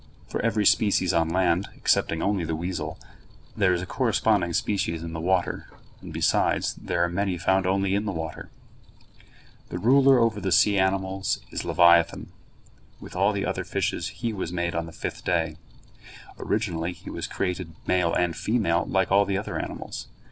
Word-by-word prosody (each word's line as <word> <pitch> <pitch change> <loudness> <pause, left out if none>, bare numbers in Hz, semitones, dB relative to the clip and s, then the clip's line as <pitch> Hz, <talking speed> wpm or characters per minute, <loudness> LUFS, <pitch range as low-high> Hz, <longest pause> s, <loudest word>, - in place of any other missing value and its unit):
For - - -3
every 110 -2 +1
species 95 -4 +3
on 80 -1 +2
land, 90 +1 +1
excepting 80 - +1
only 100 -3 0
the 80 0 -2
weasel, 85 +3 -4 0.6
there 95 -4 +3
is 90 0 0
a - - -4
corresponding 105 -5 +1
species 85 -4 -1
in 85 -1 -6
the 80 - -4
water, 90 +1 0 0.3
and, - - -9
besides, - - +1
there 85 - -1
are - - +2
many 95 +1 -1
found 95 +2 +1
only 95 0 +1
in 100 +2 0
the 100 - -1
water. 80 -3 -6 1.2
The - - -4
ruler 135 +6 +5
over 115 -3 +1
the 95 0 -1
sea 100 +2 +4
animals 95 0 0
is - - -4
leviathan. 85 -1 +4 0.7
With - - -11
all 100 +3 +3
the 100 -1 -2
other 95 - -2
fishes 90 -1 -2
he 115 +2 -4
was 95 -4 -4
made 85 -1 -2
on 85 0 -2
the - - -9
fifth 80 - -6
day. 80 -3 0 0.8
Originally 90 -5 -1
he - - -10
was - - -4
created 90 -3 -3
male 90 -2 +2
and 85 -1 0
female 100 -7 0
like 95 -1 +1
all 100 +1 +5
the 100 -1 -1
other - - -4
animals. - - -6
95 Hz, 175 wpm, -25 LUFS, 85-100 Hz, 1.2 s, ruler